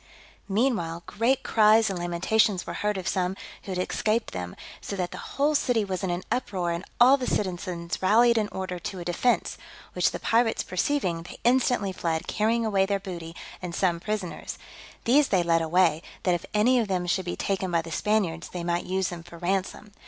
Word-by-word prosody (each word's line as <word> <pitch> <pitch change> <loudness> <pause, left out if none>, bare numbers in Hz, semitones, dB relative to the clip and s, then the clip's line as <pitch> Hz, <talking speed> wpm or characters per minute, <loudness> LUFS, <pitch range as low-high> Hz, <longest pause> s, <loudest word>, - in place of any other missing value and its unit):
Meanwhile, 195 -7 0
great 235 +5 +1
cries 220 0 +5
and 185 - -4
lamentations 180 +3 +1
were - - -5
heard 210 -1 -1
of 190 -1 -4
some 185 0 0 0.3
who 195 - -5
had - - -3
escaped 220 +2 0
them; 90 -1 -5 0.3
so 200 - -5
that 180 -2 -2
the - - -7 0.2
whole 290 +2 +3
city 245 -7 +2
was 190 -2 -3
in 190 - 0
an 175 +1 -2
uproar, 185 -8 -1
and 170 +2 -3 0.2
all 255 +3 +7
the 255 - -4
citizens 175 -3 -2
rallied 235 +5 +5
in 215 -2 +1
order, 185 -2 -5
to 185 +2 -5
a 175 - -6
defence; 180 +8 0 0.3
which - - +2
the - - -6
pirates 230 0 +2
perceiving, 185 -3 -1
they 170 - -10
instantly 245 -4 +2
fled, 165 -3 -2
carrying 225 +2 +1
away 195 -3 +2
their 200 0 0
booty, 170 -4 -7 0.3
and 175 -2 -5
some 175 -3 +1
prisoners: 205 -1 -4 0.5
these 275 +4 +5
they 185 -3 +2
led 165 -1 +2
away, 165 -1 +3 0.2
that 180 - +3
if 175 - -3
any 240 +5 +4
of 225 - 0
them 185 -2 -1
should 175 +2 0
be 175 - -3
taken 190 -1 -1
by 170 -1 +1
the 165 - -9
Spaniards, 185 -5 0
they 175 -1 -5
might 170 0 -1
use 190 0 0
them 175 -1 -7
for 170 0 -12
ransom. 190 +3 -2
190 Hz, 200 wpm, -26 LUFS, 175-220 Hz, 0.5 s, all